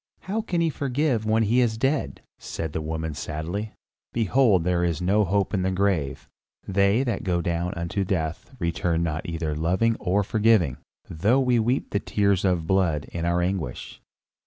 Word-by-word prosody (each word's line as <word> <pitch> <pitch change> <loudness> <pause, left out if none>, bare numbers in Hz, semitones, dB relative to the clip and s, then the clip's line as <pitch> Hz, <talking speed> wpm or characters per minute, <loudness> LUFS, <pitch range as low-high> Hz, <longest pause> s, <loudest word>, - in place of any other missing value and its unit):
"How 210 +4 -2
can 175 -6 -1
he 165 -1 +2
forgive 135 -5 0
when 110 +1 +3
he 115 +4 +2
is 115 -3 +2
dead?" 135 +5 -1 0.2
said 80 -2 -5
the 80 - -2
woman 80 0 -3
sadly. 80 +10 -4 0.4
"Behold 115 -4 +3
there 90 0 +1
is 85 -3 0
no 100 +4 +2
hope 100 +2 0
in 95 - +1
the 95 - +1
grave; 95 -7 -1 0.4
they 100 +5 +3
that 120 -6 -2
go 90 -2 0
down 85 +1 -1
unto 85 +4 -2
death 85 - -3
return 85 -2 0
not 80 +1 -2
for - - -5
either 80 -2 -2
loving 90 +9 +1
or 100 +3 +1
forgiving, 105 - +2 0.3
though 105 +11 +2
we 125 -3 +3
weep 120 +4 0
tears 100 -3 +1
of 90 -4 +1
blood 85 -5 +1
in 85 -1 -3
our 85 +1 +1
anguish." 90 -9 -4
95 Hz, 175 wpm, -25 LUFS, 85-110 Hz, 0.4 s, when